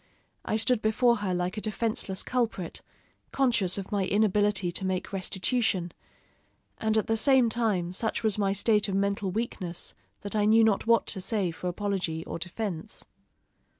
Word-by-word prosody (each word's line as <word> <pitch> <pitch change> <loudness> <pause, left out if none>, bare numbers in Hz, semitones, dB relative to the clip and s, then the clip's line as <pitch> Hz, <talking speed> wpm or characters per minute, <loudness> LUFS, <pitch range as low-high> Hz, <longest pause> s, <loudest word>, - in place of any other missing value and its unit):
I - - -1
stood 225 +1 +3
before 235 +3 +3
her 205 -3 -2
like 180 +3 -2
a - - -2
defenseless 215 -3 -2
culprit, 230 -8 -2 0.5
conscious 230 -9 +1
of 195 -1 -6
my 200 -2 0
inability 205 -3 +2
to 190 - -3
make 185 +1 -2
restitution; 190 -1 -1 0.9
and 220 0 +1
at 215 - +2
the 225 - +1
same 255 +1 +4
time, 210 -7 +1
such 220 +5 -2
was 215 -3 +1
my 195 -1 +2
state 210 +1 +2
of 190 - -1
mental 200 0 0
weakness 185 -4 -4 0.3
that 205 +1 -4
I 210 -1 +2
knew 220 +2 +5
not 220 -1 +2
what 230 -2 +4
to 190 - -3
say 190 -2 0
for 175 +2 -6
apology 180 -4 -2
or - - -5
defense. 175 -1 -5
205 Hz, 165 wpm, -28 LUFS, 185-220 Hz, 0.9 s, knew